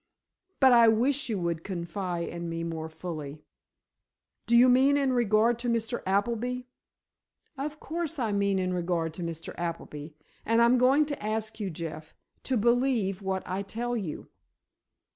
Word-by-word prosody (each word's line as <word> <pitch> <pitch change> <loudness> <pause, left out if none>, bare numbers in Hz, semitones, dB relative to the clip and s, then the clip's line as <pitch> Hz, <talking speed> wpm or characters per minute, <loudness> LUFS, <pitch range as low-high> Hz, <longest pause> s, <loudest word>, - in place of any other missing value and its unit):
But 265 -2 +7
I 235 -1 +7
wish 255 +6 +2
you 215 - 0
would 170 -2 -2
confide 175 -1 -3
in 170 0 -5
me 165 0 -3
more 160 -1 -4
fully. 155 -3 -7 1.0
Do 235 - +3
you 245 +2 +8
mean 265 +3 +5
in 275 -2 +1
regard 230 0 +3
to 240 0 -2
Mr. 230 +1 -1
Appleby?" 235 +5 0 0.9
"Of 295 +2 -5
course 330 0 -4
I 230 -5 -1
mean 200 -1 +1
in 185 -1 0
regard 170 -2 -1
to 175 - -8
Mr. 165 -1 -5
Appleby. 165 -3 -5 0.3
And 230 +1 +2
I'm 235 +2 +5
going 270 +4 +4
to 290 -6 -5
ask 220 +1 -3
you, 205 -3 -2
Jeff, 160 -2 -7 0.3
to 260 - +1
believe 235 -4 +1
what 190 -1 -2
I 185 +2 -3
tell 235 +5 -3
you." 190 -10 -5
215 Hz, 160 wpm, -28 LUFS, 170-245 Hz, 1.0 s, you